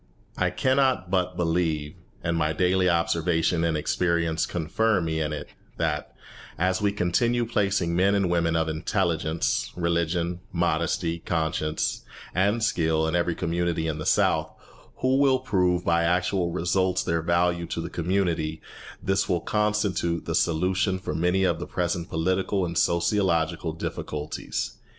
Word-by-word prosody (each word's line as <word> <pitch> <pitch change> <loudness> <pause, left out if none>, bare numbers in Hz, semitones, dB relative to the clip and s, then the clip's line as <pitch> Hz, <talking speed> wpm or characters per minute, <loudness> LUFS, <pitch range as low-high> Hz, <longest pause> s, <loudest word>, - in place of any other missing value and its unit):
I 90 - +1
cannot 130 -2 +1
but 90 -1 0
believe, 80 -3 0 0.3
and 85 0 0
my 80 -1 +1
daily 90 +2 +2
observation 85 0 +1
and 80 -2 +1
experience 85 +1 0
confirm 90 +3 0
me 80 0 -1
in 75 -1 -1
it, 75 - -5 0.3
that, - - -2 0.4
as 95 +3 +1
we 100 -1 +2
continue 115 +6 +1
placing 100 -6 0
men 95 +3 +3
and 100 -2 +2
women 85 -1 +1
of 80 0 +1
intelligence, 80 0 -1
religion, 85 0 0
modesty, 85 -1 0
conscience, 80 -2 -1 0.3
and 100 +5 +1
skill 80 -6 +1
in 80 - -1
every 85 -1 +1
community 85 -1 -1
in 80 -1 -2
the 75 - -4
South, - - +2 0.5
who 130 +1 +3
will 135 -2 +4
prove 90 -8 +1
by 85 0 +3
actual 90 +1 +1
results 90 +2 +1
their 85 0 0
value 85 +1 +1
to - - -4
the 85 +1 -5
community, 85 -3 -1 0.4
this 95 +1 +1
will 90 -3 +1
constitute 105 -5 0
the - - -2
solution 95 +4 +1
for 95 -4 -5
many 90 +4 +1
of 85 -3 +1
the 85 - -5
present 85 -1 -2
political 95 +3 0
and 85 -1 -4
sociological 85 -2 +1
difficulties. 75 -1 -4
85 Hz, 145 wpm, -26 LUFS, 80-95 Hz, 0.5 s, will